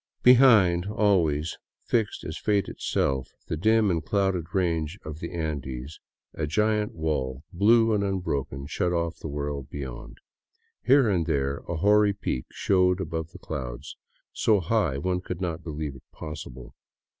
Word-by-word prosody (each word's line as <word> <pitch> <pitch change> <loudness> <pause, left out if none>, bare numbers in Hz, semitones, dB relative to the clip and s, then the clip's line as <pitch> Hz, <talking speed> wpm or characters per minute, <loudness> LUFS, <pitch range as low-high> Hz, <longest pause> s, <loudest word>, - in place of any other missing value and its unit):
Behind, 110 -9 +6
always, 85 -8 +1 0.3
fixed 110 -3 0
as 80 - -5
fate 100 0 +1
itself, 65 -1 -1 0.2
the - - -2
dim 110 +4 +3
and 80 -3 -1
clouded 95 -3 0
range 85 -3 0
of 80 0 -6
the 85 - -6
Andes, 70 -4 -4 0.3
a 75 - -3
giant 105 +5 +1
wall, 70 -5 -2
blue 115 +4 +4
and 100 -1 +1
unbroken, 70 -8 -2
shut 85 +4 -1
off 85 -1 -1
the - - -6
world 70 -1 -4
beyond. 70 -4 -7 0.6
Here 135 0 +5
and 90 -6 +1
there 70 0 0
a 85 - -1
hoary 105 +4 +4
peak 80 -10 -3
showed 90 -1 +2
above 80 -3 -3
the - - -12
clouds, 60 -6 -6 0.4
so 110 -3 +3
high 90 -6 +1
one 90 +5 -1
could 90 -1 -5
not 85 -3 -3
believe 75 -3 -5
it 65 - -14
possible. 65 -5 -8
85 Hz, 150 wpm, -26 LUFS, 75-100 Hz, 0.6 s, Behind